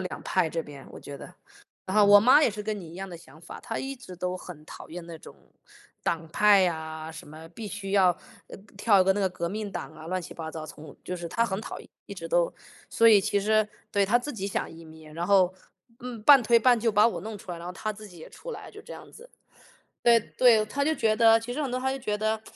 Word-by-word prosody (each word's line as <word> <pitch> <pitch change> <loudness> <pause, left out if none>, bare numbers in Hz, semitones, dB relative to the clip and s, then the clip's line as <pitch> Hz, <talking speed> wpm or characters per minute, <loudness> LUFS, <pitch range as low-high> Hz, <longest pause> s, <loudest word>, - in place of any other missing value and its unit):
两 185 - -6
派 180 -4 +1
这 165 0 -3
边， 140 -3 -12
我 - - -10
觉 140 - -9
得。 - - -12 0.5
然 190 - -3
后 210 - +7
我 205 0 +8
妈， 255 +7 +6
也 285 - +4
是 210 0 -6
跟 215 0 -3
你 170 -4 -10
一 - - -12
样 195 +2 -6
的 175 - -8
想 160 -2 -17
法， 170 - -10
她 225 - -5
一 270 +1 -5
直 245 -7 -11
都 180 +1 -3
很 170 -4 -11
讨 - - -11
厌 175 +1 -7
那 165 -1 -9
种， - - -13 0.7
党 165 -1 -2
派 200 +1 +5
啊， 160 -1 -6
什 155 - -11
么 155 +2 -12
必 220 +6 -9
须 195 -1 -6
要 190 -3 +5 0.4
呃， - - -10 0.2
跳 205 -1 +4
一 - - +4
个 190 - +4
那 205 - -3
个 190 - +2
革 170 -1 -4
命 205 0 -5
党 - - -6
啊， 155 +1 -11
乱 185 +2 -2
七 - - -9
八 160 -1 -6
糟， 160 -1 -7
从 150 -2 -12
就 180 - -5
是 170 -1 -6
她 230 +7 0
很 195 -2 -3
讨 - - -7
厌 - - -16 0.2
一 - - -8
直 - - -7
都。 - - +2 0.4
所 230 - +5
以 210 -3 +7
其 200 +1 0
实， 215 +1 +2 0.2
对， 200 -1 +2
她 230 +5 +4
自 290 +4 -6
己 195 -4 -4
想 200 - -3
移 165 0 -12
民， 160 -1 -14
然 170 +2 -3
后， 190 -2 +4 0.5
嗯， 240 -3 -7
半 280 +3 +8
推 235 +1 +4
半 245 +1 +4
就 225 0 0
把 210 +2 +5
我 - - -5
弄 220 0 -6
出 190 - -11
来， 175 - -5
然 170 - -9
后 180 - -5
她 215 +4 -4
自 215 +1 -12
己 180 -4 -14
也 160 - -11
出 - - -9
来， - - -9
就 420 - -12
这 - - -11
样 - - -11
子。 485 - -15 0.7
对 235 -1 +5
对， 225 -1 +3
她 280 +7 -2
就 315 - +1
觉 220 -5 +1
得， 225 0 +6
其 235 +2 -6
实 300 - -3
很 275 - -2
多 250 +1 -2
她 265 +1 -1
就 270 - -4
觉 210 -3 -2
得， 220 +1 -1
200 Hz, 295 characters per minute, -27 LUFS, 170-225 Hz, 0.7 s, 我